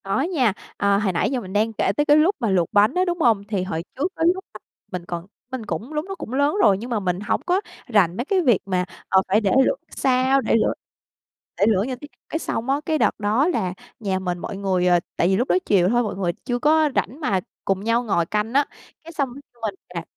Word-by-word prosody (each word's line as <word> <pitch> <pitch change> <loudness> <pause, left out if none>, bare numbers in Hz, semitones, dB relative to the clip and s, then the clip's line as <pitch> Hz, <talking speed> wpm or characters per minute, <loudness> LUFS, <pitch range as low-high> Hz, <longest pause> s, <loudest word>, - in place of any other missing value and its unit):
Có 195 +6 0
nha, 275 - +1 0.2
ờ, 200 0 +3
hồi 200 -2 0
nãy 170 - +1
giờ 260 - 0
mình 190 -3 -9
đang 220 +2 +1
kể 195 - +1
tới 295 - +2
cái 295 0 +6
lúc 340 +7 +4
mà 230 - 0
luộc 180 -4 +2
bánh 205 +1 +5
á, 365 +1 +2
đúng 350 -1 -2
hông? 225 -7 +3
Thì 200 -3 -1
hồi 165 -3 -3
trước, 285 - 0
cái 325 - 0
lúc 380 +1 -8 0.5
mình 180 -2 -5
còn 175 -1 -5 0.3
mình 255 -4 -5
cũng 210 - -5
lúc 300 +2 -2
nó 390 - -5
cũng 250 - -7
lớn 285 +5 +2
rồi, 195 - +5
nhưng 235 +5 -7
mà 230 -3 0
mình 180 -2 -1
hổng 205 - -1
có 365 +2 +2 0.3
rành 195 -7 +3
mấy 245 - -2
cái 380 +3 +2
việc 245 - +4
mà, 185 -2 0 0.2
ờ, 190 - +5
phải 205 +4 +3
để 200 -3 +1
lửa - - +2
sao, 260 +1 +2
để - - +1
lửa 225 - +2 0.8
để 200 - +3
lửa 200 -3 +3
như 260 - -3
thế 290 +4 -11 0.2
Cái 320 - -2
xong 240 -5 -3
á, 280 +2 +1
cái 315 -1 +1
đợt - - +1
đó 215 +8 +2
là 210 - 0 0.3
nhà 195 -4 -1
mình 180 -2 -2
mọi 195 - -5
người, 190 -2 +1
ờ, 175 -1 +5 0.2
tại 170 - +3
vì 190 - +3
lúc 245 - 0
đó - - +4
chiều 185 -3 +3
thôi 240 +2 +2
mọi 210 - -3
người 185 -3 0
chưa 245 -2 -1
có 310 +2 +4
rảnh 270 - -1
mà 200 - +1 0.3
cùng 195 0 0
nhau 230 +2 +1
ngồi 185 -7 +1
canh 210 +5 -2
á, 285 +1 +4 0.4
cái 330 - -10
xong 280 -4 -1 0.3
mình 210 -3 -2 0.2
nè 170 - -3
220 Hz, 255 wpm, -23 LUFS, 190-275 Hz, 0.8 s, cái